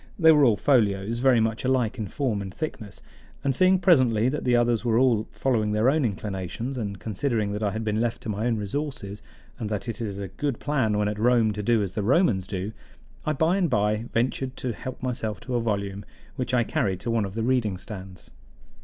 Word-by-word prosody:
They 160 -3 +7
were 150 -2 +5
all 115 -5 +4
folios, 110 -4 +2
very 130 -2 +4
much 110 0 0
alike 130 -4 +1
in 105 - -2
form 115 -2 -1
and 95 -1 -6
thickness; 110 - -6 0.4
and 140 - +1
seeing 185 +7 +4
presently 130 - +4
that 150 - -3
the 125 -1 +3
others 120 -1 +2
were 115 -2 +2
all 120 -4 +3
following 110 -1 0
their 110 +5 +3
own 155 0 +1
inclinations, 105 +3 -3
and 100 -5 -4
considering 110 0 -1
that 105 +1 -3
I 105 - +1
had 110 +2 -4
been 110 0 0
left 120 -1 -2
to - - -5
my 105 +3 -1
own 115 -2 +1
resources 105 -2 -4 0.4
and 110 -3 -3
that 105 +3 -3
it 115 +1 -4
is 100 -4 -3
a 100 -1 -4
good 140 - -3
plan 130 -8 0
when 105 0 +1
at 105 0 -3
Rome 115 -2 +3
to 105 - -4
do 110 0 +2
as 95 -2 -4
the 105 - -2
Romans 110 - +2
do, 95 +1 -4 0.6
I 155 - +2
by 160 +6 +2
and 180 -4 +1
by 105 -1 +1
ventured 130 +2 -1
to 125 -2 -3
help 130 +3 -8
myself 110 -6 -2
to 130 - -6
a 120 - +1
volume, 100 -3 -2 0.3
which 130 -2 -3
I 120 - +3
carried 95 -4 -1
to 115 - -2
one 115 -2 +1
of 100 0 -5
the 115 - -1
reading 115 -6 +1
stands. 95 -1 -10
115 Hz, 225 wpm, -25 LUFS, 105-130 Hz, 0.6 s, They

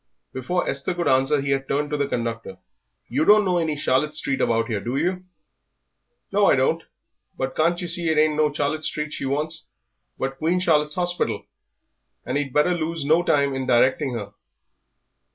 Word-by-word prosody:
Before 175 +8 -2
Esther 140 +6 -2
could 175 -1 -1
answer 135 +3 +3
he 140 0 -2
had 135 0 -1
turned 145 +1 -1
to 150 - 0
the 140 -1 0
conductor. 115 -6 -4 0.5
"You - - 0
don't 210 +3 +6
know 180 -2 +2
any 160 -3 -1
Charlotte 145 +2 +1
Street 135 -3 -1
about 115 0 +2
here, 110 -3 -2
do 120 +6 -3
you?" 180 +4 -1 1.1
"No, - - +3
I - - +5
don't. - - +1 0.6
But 130 0 -3
can't 170 +2 +2
yer 175 - -4
see 170 0 -2
that 160 -1 +1
it - - +6
ain't 155 -1 +1
no 150 -1 +2
Charlotte 145 +2 -2
Street 150 0 -3
she - - -4
wants, 155 +3 -2 0.5
but 135 0 -4
Queen 170 +3 +1
Charlotte's 150 -4 +2
Hospital? 175 -1 -1 0.8
And - - -3
ye'd 145 -2 -1
better 150 +6 +3
lose 165 -2 -3
no 160 +4 +4
time 140 -5 +2
in 130 -1 -3
directing 130 +2 +2
her." 100 -3 -6
150 Hz, 190 wpm, -23 LUFS, 135-165 Hz, 1.1 s, don't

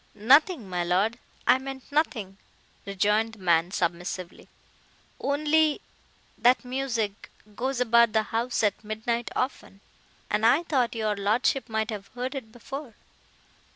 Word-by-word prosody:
"Nothing, 265 - +4
my 180 -1 -2
Lord, 195 +7 +1 0.3
I 255 - +5
meant 265 +1 -8
nothing," 220 -10 -1 0.5
rejoined 210 +3 +1
the - - -12
man 170 -2 +2
submissively—"Only—that 245 - -2
music—goes 245 -1 -3
about 235 -2 +4
the 220 -1 +3
house 230 +2 -1
at 205 0 0
midnight 220 +2 -2
often, 255 -6 -3 0.5
and 210 +1 -1
I 275 +9 +5
thought 260 -8 0
your 215 -2 0
lordship 220 +6 +1
might 220 +1 -1
have 200 -2 -6
heard 250 +2 -3
it 255 -6 -7
before." 245 +1 -8
225 Hz, 120 wpm, -26 LUFS, 205-260 Hz, 0.5 s, I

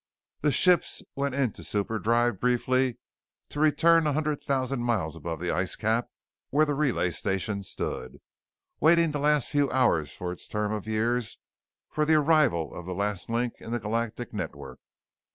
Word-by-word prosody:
The 150 - +3
ships 180 +5 +3
went 140 -1 -1
into 130 -6 -1
superdrive 110 +1 0
briefly 125 0 +1 0.5
to 145 - -6
return 155 +2 +4
a - - +3
few - - 0
hundred 150 -1 -1
thousand 135 -2 -1
miles 110 -10 -1
above 80 0 -5
the 90 +1 -1
ice 90 +3 0
cap 115 +2 0 0.4
where 150 +3 +3
the 145 - -1
relay 135 -11 +1
station 100 +3 -2
stood, 65 -8 -5 0.6
waiting 165 +1 +4
the 145 - -2
last 150 -2 +2
few 145 -1 +2
hours 85 - +1
of 90 -1 -3
its 90 - -7
term 105 0 -2
of 110 -1 -4
years 115 +2 0 0.5
for 155 - 0
the 155 +1 +4
arrival 150 - +3
of 90 - -8
the 90 - -4
last 100 -1 -2
link 120 +1 0
in - - -10
the 120 - 0
Galactic 115 +2 -3
Network. 70 -9 -6
120 Hz, 170 wpm, -27 LUFS, 100-145 Hz, 0.6 s, return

